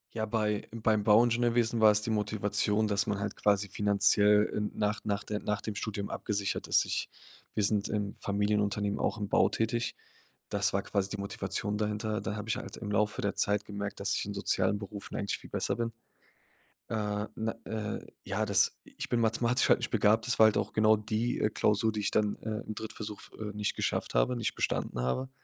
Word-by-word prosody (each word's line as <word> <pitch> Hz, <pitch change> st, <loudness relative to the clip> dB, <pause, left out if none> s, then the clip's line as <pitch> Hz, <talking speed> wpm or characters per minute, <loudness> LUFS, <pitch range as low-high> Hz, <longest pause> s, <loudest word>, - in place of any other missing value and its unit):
Ja, 110 Hz, -, -1 dB
bei 105 Hz, -1 st, -1 dB
beim 110 Hz, -2 st, +1 dB
Bauingenieurwesen 115 Hz, +1 st, +3 dB
war 110 Hz, -, +8 dB
es 105 Hz, 0 st, +1 dB
die 115 Hz, -, -4 dB
Motivation, 105 Hz, 0 st, +1 dB
dass 100 Hz, 0 st, +1 dB
man 100 Hz, -2 st, -1 dB
halt 100 Hz, 0 st, -3 dB
quasi 100 Hz, -1 st, +2 dB
finanziell 105 Hz, +1 st, +4 dB
n 105 Hz, 0 st, -1 dB
nach 105 Hz, +1 st, -1 dB
nach 100 Hz, -1 st, -1 dB
der 105 Hz, -1 st, -3 dB
nach 105 Hz, 0 st, -2 dB
dem 110 Hz, -, -4 dB
Studium 100 Hz, 0 st, -3 dB
abgesichert 100 Hz, -1 st, -2 dB
ist. -, -, +4 dB
Ich -, -, -2 dB, 0.4 s
wir 105 Hz, -, 0 dB
sind 100 Hz, 0 st, +1 dB
im 105 Hz, -1 st, -2 dB
Familienunternehmen 105 Hz, 0 st, 0 dB
auch 110 Hz, -, 0 dB
im 105 Hz, -, -2 dB
Bau -, -, +4 dB
tätig. 115 Hz, +1 st, -1 dB, 0.6 s
Das 100 Hz, -1 st, +1 dB
war 100 Hz, -, +1 dB
quasi 100 Hz, -1 st, -1 dB
die 105 Hz, -, -4 dB
Motivation 100 Hz, +1 st, -2 dB
dahinter. 105 Hz, 0 st, -1 dB
Da 105 Hz, -, -3 dB
habe 105 Hz, +1 st, -6 dB
ich 110 Hz, -, +1 dB
halt -, -, -7 dB
im 105 Hz, -, -6 dB
Laufe 105 Hz, 0 st, +1 dB
der 100 Hz, -, 0 dB
Zeit 105 Hz, 0 st, +1 dB
gemerkt, 100 Hz, 0 st, -5 dB
dass 100 Hz, +1 st, 0 dB
ich -, -, -1 dB
in 100 Hz, -, -4 dB
sozialen 100 Hz, 0 st, +1 dB
Berufen 100 Hz, 0 st, -7 dB
eigentlich 100 Hz, -1 st, -2 dB
viel -, -, -13 dB
besser -, -, -1 dB
bin. 115 Hz, 0 st, -1 dB, 1.0 s
Äh, 105 Hz, -1 st, -1 dB
na 110 Hz, 0 st, -2 dB
äh, 110 Hz, -2 st, -4 dB, 0.2 s
ja, -, -, -1 dB
das -, -, +3 dB
ich -, -, -7 dB
bin 120 Hz, -1 st, +1 dB
mathematisch 120 Hz, +3 st, +2 dB
halt -, -, +6 dB
nicht -, -, -3 dB
begabt. 110 Hz, +3 st, +3 dB
Das 125 Hz, -, 0 dB
war 110 Hz, -, +9 dB
halt 110 Hz, -, +2 dB
auch -, -, -1 dB
genau 110 Hz, 0 st, +5 dB
die, 110 Hz, +3 st, -1 dB
äh, 105 Hz, -, +2 dB
Klausur, 105 Hz, +1 st, +2 dB
die 105 Hz, -, -2 dB
ich 100 Hz, -, 0 dB
dann, 105 Hz, -1 st, +1 dB
äh, 110 Hz, 0 st, -3 dB
im 110 Hz, -, -4 dB
Drittversuch 110 Hz, -1 st, -6 dB
f -, -, -14 dB
äh, 105 Hz, -1 st, -5 dB
nicht 105 Hz, 0 st, -1 dB
geschafft -, -, -1 dB
habe, -, -, +2 dB
nicht 115 Hz, -3 st, -2 dB
bestanden 60 Hz, -, -1 dB
habe. 65 Hz, -, -1 dB
105 Hz, 210 wpm, -30 LUFS, 100-110 Hz, 1.0 s, war